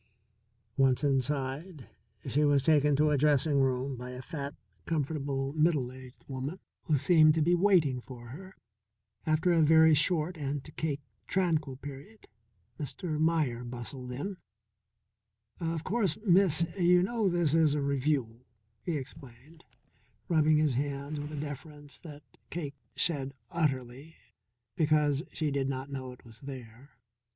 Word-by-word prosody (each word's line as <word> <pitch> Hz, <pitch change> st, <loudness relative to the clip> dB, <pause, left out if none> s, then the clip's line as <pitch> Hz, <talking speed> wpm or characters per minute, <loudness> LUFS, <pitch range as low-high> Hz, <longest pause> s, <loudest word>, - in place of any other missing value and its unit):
Once 135 Hz, 0 st, +3 dB
inside 140 Hz, +3 st, -1 dB, 0.4 s
she 150 Hz, +3 st, +2 dB
was 145 Hz, -2 st, +3 dB
taken 150 Hz, -1 st, +4 dB
to 150 Hz, +2 st, +3 dB
a 145 Hz, -, +3 dB
dressing 145 Hz, 0 st, +3 dB
room 130 Hz, 0 st, 0 dB
by 125 Hz, +1 st, -7 dB
a 125 Hz, 0 st, -7 dB
fat, 145 Hz, -1 st, -6 dB, 0.3 s
comfortable, 140 Hz, -3 st, -2 dB
middle 150 Hz, -5 st, +2 dB
aged 130 Hz, -1 st, -13 dB
woman 140 Hz, +7 st, -5 dB, 0.3 s
who 155 Hz, -3 st, +2 dB
seemed 155 Hz, +2 st, +5 dB
to 160 Hz, -, +1 dB
be 175 Hz, +3 st, +3 dB
waiting 170 Hz, -9 st, +3 dB
for 120 Hz, -2 st, -11 dB
her. 185 Hz, +9 st, -10 dB, 0.7 s
After 160 Hz, +3 st, +2 dB
a 165 Hz, -, +4 dB
very 160 Hz, +1 st, +6 dB
short 160 Hz, +3 st, +2 dB
and, 140 Hz, -1 st, -3 dB
to 155 Hz, -, -12 dB
Cake, 150 Hz, -2 st, -3 dB, 0.3 s
tranquil 160 Hz, -7 st, 0 dB
period, 145 Hz, +11 st, -11 dB, 0.5 s
Mr. 155 Hz, +2 st, -3 dB
Meier 155 Hz, -7 st, +1 dB
bustled 125 Hz, +1 st, -6 dB
in. 165 Hz, +10 st, -4 dB, 1.2 s
"Of 165 Hz, -1 st, -2 dB
course, 195 Hz, -5 st, 0 dB
Miss, 175 Hz, -3 st, +5 dB
you 180 Hz, 0 st, +5 dB
know 220 Hz, 0 st, +1 dB
this 170 Hz, -4 st, +1 dB
is 160 Hz, -3 st, +4 dB
a 150 Hz, -, 0 dB
Revue," 135 Hz, -4 st, 0 dB, 0.4 s
he 170 Hz, -4 st, -2 dB
explained, 135 Hz, +3 st, -12 dB, 0.6 s
rubbing 155 Hz, -3 st, +4 dB
his 150 Hz, -3 st, +2 dB
hands 140 Hz, +2 st, -3 dB
with 145 Hz, +1 st, -6 dB
a 150 Hz, -, -5 dB
deference 145 Hz, 0 st, -8 dB
that 150 Hz, -3 st, -11 dB, 0.3 s
Cake 150 Hz, -5 st, -4 dB, 0.2 s
shed 140 Hz, -5 st, -1 dB, 0.2 s
utterly, 140 Hz, -2 st, -2 dB, 0.6 s
because 150 Hz, -2 st, +2 dB
she 155 Hz, -2 st, -2 dB
did 135 Hz, -1 st, 0 dB
not 135 Hz, +1 st, -4 dB
know 130 Hz, -2 st, -5 dB
it 125 Hz, -, -15 dB
was 115 Hz, -1 st, -10 dB
there. 130 Hz, -1 st, -10 dB
145 Hz, 145 wpm, -30 LUFS, 135-160 Hz, 1.2 s, very